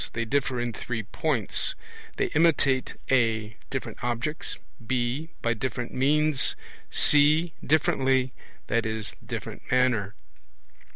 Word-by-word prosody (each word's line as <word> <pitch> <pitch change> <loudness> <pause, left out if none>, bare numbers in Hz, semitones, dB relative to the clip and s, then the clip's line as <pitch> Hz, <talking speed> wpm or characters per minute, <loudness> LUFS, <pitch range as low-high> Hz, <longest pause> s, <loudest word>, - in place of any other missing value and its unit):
They 115 0 -1
differ 135 0 0
in 120 -1 -2
three 115 0 -4
points; 115 +1 -1 0.4
they - - 0
imitate 145 -5 +3 0.2
(a) 115 -4 +2
different 135 -3 -5
objects, 125 +6 -2 0.3
(b) 125 +6 -1
by 115 - +2
different 120 +1 -4
means, 150 +2 +3 0.3
(c) 155 +3 +4
differently 135 -5 +2 0.3
(i.e. 110 -2 0 0.2
different - - -5
manner). 125 -6 +2
130 Hz, 105 wpm, -27 LUFS, 115-145 Hz, 0.4 s, c